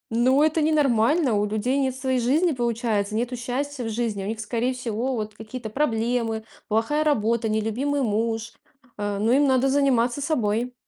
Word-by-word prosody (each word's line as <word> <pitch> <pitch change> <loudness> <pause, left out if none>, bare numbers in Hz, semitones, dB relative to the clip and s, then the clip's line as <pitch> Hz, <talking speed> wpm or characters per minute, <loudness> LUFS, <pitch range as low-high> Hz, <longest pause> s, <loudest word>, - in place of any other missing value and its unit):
Ну, 260 +5 +4
это 315 +1 +2
ненормально, 295 -2 +3
у 205 0 +2
людей 220 +6 0
нет 260 -1 0
своей 260 -1 -1
жизни, 300 +9 +2
получается, 230 -4 -1
нету 245 +2 -1
счастья 255 +3 -3
в 225 - -3
жизни, 220 -3 -2
а - - -5
у - - -4
них, 220 0 -4
скорее 235 +4 -1
всего, 250 +1 -2
вот 215 -1 -4
какие-то 220 +1 -8
проблемы, 230 -4 0 0.2
плохая 230 +8 +1
работа, 230 -5 +1
нелюбимый 240 +7 0
муж, 225 +1 -1 0.4
а, 205 -1 -3
но 220 +3 +1
им 285 +2 +4
надо 260 0 +3
заниматься 265 -2 +2
собой. 245 -4 0
240 Hz, 170 wpm, -24 LUFS, 220-270 Hz, 0.4 s, Ну